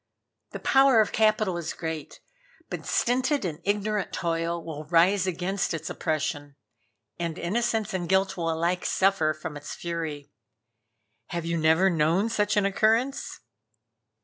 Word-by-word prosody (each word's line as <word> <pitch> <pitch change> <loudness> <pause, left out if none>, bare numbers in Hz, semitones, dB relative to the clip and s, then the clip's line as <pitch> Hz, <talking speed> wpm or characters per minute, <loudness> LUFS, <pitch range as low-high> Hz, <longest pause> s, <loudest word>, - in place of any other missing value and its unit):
The - - -7
power 270 -3 +5
of 215 - +3
capital 215 -4 +2
is 170 - -4
great, 160 -3 -6 0.5
but - - -5
stinted 255 +1 +1
and 160 -3 -4
ignorant 205 0 -1
toil 170 0 -2
will 155 -2 -6
rise 180 +4 +3
against 185 0 -1
its 165 - -5
oppression, 145 -2 -3 0.6
and 170 -1 -3
innocence 220 +3 -1
and 175 -2 -3
guilt 190 0 +2
will 165 -2 -2
alike 170 +3 0
suffer 190 -5 +2
from 155 0 -6
its 145 0 -7
fury. 160 -4 -5 1.0
Have 170 -1 -4
you 170 0 -1
never 160 +3 +4
known 170 +6 +2
such 210 -2 0
an 205 - +3
occurrence?" 225 +7 +1
175 Hz, 140 wpm, -26 LUFS, 165-210 Hz, 1.0 s, power